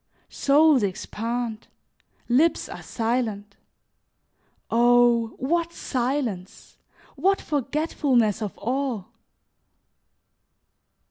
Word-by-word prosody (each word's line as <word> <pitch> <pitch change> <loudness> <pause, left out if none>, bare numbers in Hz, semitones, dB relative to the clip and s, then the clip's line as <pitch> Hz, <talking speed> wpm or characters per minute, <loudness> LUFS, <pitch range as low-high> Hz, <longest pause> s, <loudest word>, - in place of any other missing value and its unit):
Souls 290 -1 +4
expand, 225 +3 -3 0.6
lips 290 +8 +2
are - - -8
silent. 225 -4 -2 1.2
Oh! 240 -1 +4
what 335 +5 -1
silence! 245 - -3 0.4
What 390 +1 +2
forgetfulness 275 - 0
of 210 -3 -5
all! 245 -3 -2
245 Hz, 65 wpm, -24 LUFS, 225-280 Hz, 1.2 s, Souls